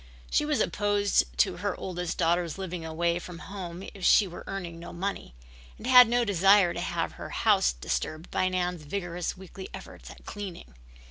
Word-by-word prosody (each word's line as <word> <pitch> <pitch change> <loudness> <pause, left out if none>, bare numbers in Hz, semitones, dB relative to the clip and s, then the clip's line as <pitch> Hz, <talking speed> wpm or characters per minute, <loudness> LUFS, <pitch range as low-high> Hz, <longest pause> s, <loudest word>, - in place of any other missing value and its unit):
She 300 - +3
was 300 -1 0
opposed 205 -1 +2
to 65 - +2
her - - -3
oldest 180 -2 -4
daughter's 170 0 +1
living 180 -3 -5
away 170 +2 0
from 175 -1 -9
home 180 -1 -7
if 195 - -11
she 205 - +6
were 175 - -9
earning 175 -4 -5
no 170 - -8
money, 185 - -4 0.4
and - - -10
had 250 -1 +9
no 240 0 +2
desire 195 -2 +5
to - - -4
have - - -2
her - - -8
house - - +3
disturbed 155 - -4
by 185 - +1
Nan's 180 -2 -1
vigorous 175 +2 -4
weekly 190 +1 -9
efforts - - -11
at - - -14
cleaning. 185 - -7
180 Hz, 180 wpm, -28 LUFS, 170-200 Hz, 0.4 s, had